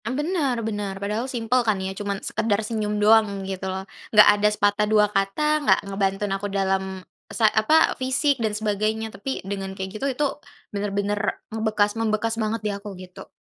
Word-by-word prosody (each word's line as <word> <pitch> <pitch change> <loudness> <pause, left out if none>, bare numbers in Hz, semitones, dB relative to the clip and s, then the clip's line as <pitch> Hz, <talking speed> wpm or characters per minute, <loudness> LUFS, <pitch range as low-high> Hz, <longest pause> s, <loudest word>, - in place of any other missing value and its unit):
Mmm, 255 +4 -2
bener 295 -5 0
bener, 205 -3 -3
padahal 210 +6 -3
simpel 250 0 +1
kan 215 -4 +1
ya 190 - -3
cuman 200 0 -3
sekedar 210 -2 0
senyum 210 -2 -2
doang 210 -2 +3
gitu 190 0 -4
loh, 190 0 -4 0.2
nggak 210 -1 +7
ada 205 0 +2
sepatah 210 0 +1
dua 210 -1 +5
kata, 300 +11 +1
nggak 290 - +4
ngebantuin 195 0 -1
aku 195 +1 -2
dalam, 190 -1 -1 0.2
sa 225 - +1
apa, 265 +10 +4
fisik 265 +1 +1
dan 215 -2 0
sebagainya, 215 +1 -1
tapi 265 0 -5
dengan 195 -1 -4
kayak 190 0 -4
gitu - - -1
itu 275 +3 0 0.5
bener-bener 205 0 -1 0.3
ngebekas 215 -2 +1
membekas 225 0 0
banget 220 +1 -1
di - - +1
aku 200 -1 -8
gitu. 180 0 -11
210 Hz, 175 wpm, -24 LUFS, 200-225 Hz, 0.5 s, nggak